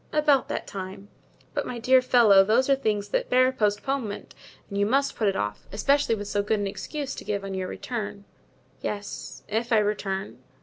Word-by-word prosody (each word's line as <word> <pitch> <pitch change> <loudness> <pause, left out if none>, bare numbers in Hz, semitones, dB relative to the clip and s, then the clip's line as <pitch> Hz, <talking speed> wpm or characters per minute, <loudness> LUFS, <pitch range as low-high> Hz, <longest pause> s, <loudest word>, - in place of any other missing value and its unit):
"About 300 -3 +3
that - - -3
time." 195 +1 -7 0.4
"But, - - -2
my 245 - -4
dear 255 +2 +5
fellow, 230 -6 +6
those 230 +6 +3
are - - +6
things 210 -6 -1
that - - -1
bear 255 +1 +4
postponement 215 0 -2 0.3
and 200 - -4
you - - +3
must 275 +4 +1
put 220 - 0
it 195 - +1
off, 105 0 -3
especially 275 +3 +2
with 205 -1 -6
so 205 - 0
good 210 +1 0
an 205 - -1
excuse 275 +8 -4
to - - -8
give 200 -1 -2
on 195 0 -5
your 190 -1 -2
return——" 205 -4 -5 0.6
"Yes, 205 -1 -5
if 225 +3 -2
I 225 - +5
return." 205 -2 -1
210 Hz, 190 wpm, -26 LUFS, 200-255 Hz, 0.6 s, fellow